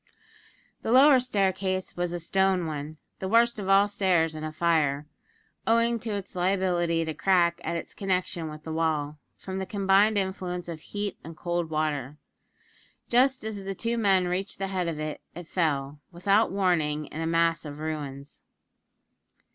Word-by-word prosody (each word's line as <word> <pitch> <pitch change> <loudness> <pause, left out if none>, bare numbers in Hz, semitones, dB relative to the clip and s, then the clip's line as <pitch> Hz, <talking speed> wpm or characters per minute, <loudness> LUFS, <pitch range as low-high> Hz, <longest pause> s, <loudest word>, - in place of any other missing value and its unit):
The - - -2
lower 265 +2 +7
staircase 190 -5 -1
was 175 -1 -1
a 175 - -3
stone 190 +1 +1
one 155 0 -5 0.2
the 190 - -3
worst 230 +2 +3
of 195 -1 -4
all 195 +1 +6
stairs 180 -5 +1
in 155 0 -6
a 155 - -3
fire, 155 -3 +1 0.6
owing 230 +1 +3
to 225 - -6
its 200 -2 -7
liability 175 -3 +1
to 160 - -3
crack 170 +1 +2
at 170 - -2
its 170 - -5
connection 180 -4 -2
with 155 0 -10
the 160 - -5
wall, 155 -2 -1 0.2
from 190 0 -5
the 190 - -3
combined 200 +1 +3
influence 185 -2 -3
of 165 -2 -6
heat 205 +2 -5
and 165 -1 -10
cold 175 -1 -2
water. 150 -3 -2 0.9
Just 255 +1 +3
as 215 -2 -5
the 195 0 -4
two 230 +4 -2
men 195 -5 +3
reached 185 +3 -2
the 195 0 -3
head 185 -2 -1
of 160 -2 -3
it, 155 0 -4
it 175 -1 -8
fell, 145 -5 -1
without 195 +5 +2
warning, 165 -6 +1
in 155 +2 -7
a 165 - -1
mass 165 0 +2
of 145 -2 -7
ruins. 145 -3 -6
175 Hz, 170 wpm, -27 LUFS, 160-195 Hz, 0.9 s, lower